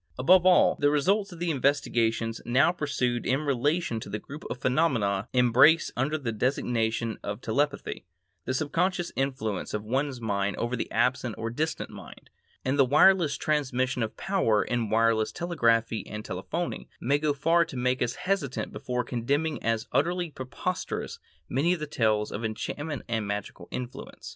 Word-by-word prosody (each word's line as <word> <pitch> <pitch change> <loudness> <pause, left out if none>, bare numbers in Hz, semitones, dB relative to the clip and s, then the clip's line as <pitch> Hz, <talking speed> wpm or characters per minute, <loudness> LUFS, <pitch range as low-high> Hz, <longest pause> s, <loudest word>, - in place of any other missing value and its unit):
Above 180 +8 +5
all, 180 - +5
the 145 - +4
results 195 +8 +1
of 175 - -9
the 170 0 -1
investigations 115 -5 0
now 130 +7 +4
pursued 125 -7 -1
in 135 +3 +1
relation 145 -1 0
to 105 - -8
the 105 - -2
group 140 +7 -10
of - - -4
phenomena 120 -8 +1
embraced 130 +6 +5
under 145 +5 0
the 130 -6 -3
designation 115 -1 -1
of 105 +1 -4
telepathy,—the 90 - -3
subconscious 175 +5 0
influence 130 -9 -2
of 105 - -3
one 135 +6 0
mind 100 -3 -1
over 120 +1 -3
an 125 - -1
absent 125 -2 0
or 115 0 -3
distant 155 +5 -2
mind,—and 135 +2 -7
the - - +8
wireless 150 +4 +4
transmission 130 -4 0
of 110 - -3
power 180 - +1
in 120 -3 -1
wireless 115 -1 +2
telegraphy 115 -10 +1
and 105 0 -7
telephony, 95 - -4
may 140 +4 +1
go 150 0 +1
far 165 +4 +3
to 150 -5 -8
make 125 +1 0
us 120 0 0
hesitate 180 -9 -2
before 125 0 -3
condemning 140 +6 -1
as 115 -1 -1
utterly 175 -1 0
preposterous 145 +7 -4 0.3
many 155 +8 +2
of 180 - -3
the 150 - -3
tales 110 -7 0
of 105 - -5
enchantment 140 +7 -4
and 110 -3 -1
magical 100 -3 -5
influence. 125 0 -7
130 Hz, 160 wpm, -27 LUFS, 115-150 Hz, 0.3 s, the